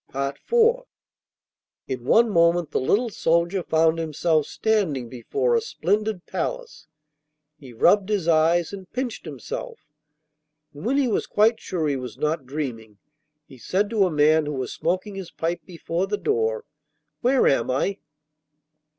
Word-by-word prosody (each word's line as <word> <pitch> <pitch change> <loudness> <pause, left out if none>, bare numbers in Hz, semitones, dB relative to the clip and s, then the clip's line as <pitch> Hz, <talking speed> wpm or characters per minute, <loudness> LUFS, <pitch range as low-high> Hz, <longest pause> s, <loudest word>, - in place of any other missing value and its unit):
IV 140 - -3 1.3
In 125 -3 -5
one 235 - +5
moment 170 -2 +3
the - - 0
little 220 - +1
soldier 170 +1 +1
found 160 0 +2
himself 155 -1 0
standing 170 - 0
before 420 - -1
a 465 - +3
splendid 215 - -1
palace. - - -5 0.7
He 135 -4 -12
rubbed 190 - +3
his 200 -6 0
eyes 165 +2 +3
and 190 -2 -9
pinched 255 -3 -4
himself, - - -7 0.9
and 145 +9 -6
when 270 +3 +2
he 280 -2 +2
was 225 - -1
quite 220 +2 +3
sure 165 -4 -2
he 140 -2 0
was 125 -4 -7
not 150 -3 -2
dreaming 120 -7 -5 0.5
he 130 - -15
said 200 - -1
to 205 -4 +3
a - - -2
man 155 0 +3
who 150 - -3
was 130 -2 -4
smoking 185 +4 -2
his 190 -3 -7
pipe 170 +2 -3
before 175 +1 -3
the 210 +1 -1
door, 450 - -1 0.6
'Where 255 +1 +3
am 120 -4 +2
I? 190 +10 0
170 Hz, 150 wpm, -24 LUFS, 150-215 Hz, 1.3 s, one